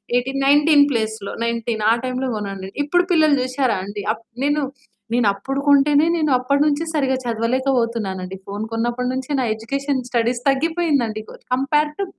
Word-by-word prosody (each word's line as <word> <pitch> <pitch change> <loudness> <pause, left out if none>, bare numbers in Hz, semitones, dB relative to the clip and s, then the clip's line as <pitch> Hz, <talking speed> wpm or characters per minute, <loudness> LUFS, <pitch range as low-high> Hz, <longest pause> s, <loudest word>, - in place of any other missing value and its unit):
Eighteen 270 +2 0
19 290 +1 +6
ప్లేస్‌లో 220 -4 -2
19 235 -1 -2
ఆ - - +6
టైంలో 255 +1 -2
కొన్నాను. 195 -2 -5 0.2
ఇప్పుడు 355 +5 +2
పిల్లలు 310 -3 +4
చూషారా 255 0 0
అండి, 205 +1 -6
అప్ 230 +1 -6 0.2
నేను 290 +1 +1 0.5
నేనప్పుడు 235 +4 0
కొంటేనే, 285 +2 +5
నేనప్పడి 280 -2 +1
నుంచి 300 +2 +1
సరిగా 270 -3 +1
చదవలేకపోతున్నానండి. 230 -5 -1
ఫోను 205 +2 -4
కొన్నప్పడి 240 +2 -1
నుంచి 260 +2 -4
నా 255 - +1
ఎడ్యుకేషన్, 275 +4 -2
స్టడీస్ 240 0 0
తగ్గిపోయిందండి. 280 -7 0
కోద్ - - -13
compare 295 +3 +1
two 395 - 0
255 Hz, 145 wpm, -21 LUFS, 225-285 Hz, 0.5 s, 19